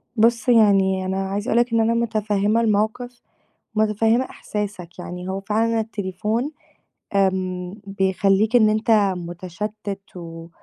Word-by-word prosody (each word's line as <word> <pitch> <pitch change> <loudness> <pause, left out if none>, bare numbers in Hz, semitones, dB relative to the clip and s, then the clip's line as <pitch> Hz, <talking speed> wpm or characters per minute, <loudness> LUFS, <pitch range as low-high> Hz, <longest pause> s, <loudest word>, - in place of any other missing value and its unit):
بُصّ، 235 +2 +3
يعني 195 -4 +4
أنا 190 +1 -2
عايزة 205 +5 -3
أقول 235 - +3
لك 240 -1 +1
إن 230 - +3
أنا 225 +1 +3
متفهّمة 215 -2 +1
الموقِف 230 +3 -1 0.5
متفهّمة 220 +3 +2
إحساسك 200 -8 -6
يعني 180 +1 -7
هو 190 +1 -3
فعلًا 225 +3 +1
التليفون 215 +4 -2 0.7
امم، 185 -2 0
بيخلّيك 195 +3 +2
إن 215 -3 +6
أنت 215 +2 +1 0.3
مُتشتّت 190 +4 -6 0.2
و 165 -1 -8
210 Hz, 125 wpm, -22 LUFS, 190-225 Hz, 0.7 s, إن